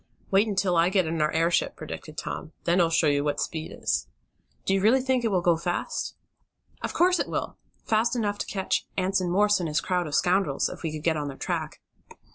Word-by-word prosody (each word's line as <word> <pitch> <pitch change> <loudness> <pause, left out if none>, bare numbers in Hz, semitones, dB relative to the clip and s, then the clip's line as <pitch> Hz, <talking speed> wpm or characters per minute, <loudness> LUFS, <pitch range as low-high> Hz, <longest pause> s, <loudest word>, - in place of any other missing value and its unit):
"Wait 200 +3 +4
until 190 -3 +1
I 170 +1 +4
get 190 -2 +2
in 160 0 -1
our 150 - +2
airship," 165 +1 +1
predicted 155 0 -8
Tom. 155 - -5
"Then 175 +1 +3
I'll 165 - +3
show 165 0 +2
you 145 -1 +2
what 145 -1 -1
speed 160 -1 -3
is!" - - -1 0.6
"Do - - +2
you 195 - +2
really 225 +6 +5
think 260 -1 +1
it - - +2
will 185 -5 +1
go 170 -2 +4
fast?" 175 +1 -3 0.7
"Of - - -3
course 360 +1 +3
it - - -1
will! - - -3 0.3
Fast 225 +2 +2
enough 205 -3 -1
to - - -3
catch 190 -2 -1
Anson 185 -1 +1
Morse 205 +3 +3
and 170 -3 -2
his 150 +1 +1
crowd 180 -2 -1
of 145 - -2
scoundrels 180 -6 +2
if - - -9
we 160 - -2
could 155 -1 -6
get 160 -1 +2
on 145 -1 -3
their 135 -1 -7
track." - - -3
180 Hz, 225 wpm, -26 LUFS, 160-200 Hz, 0.7 s, really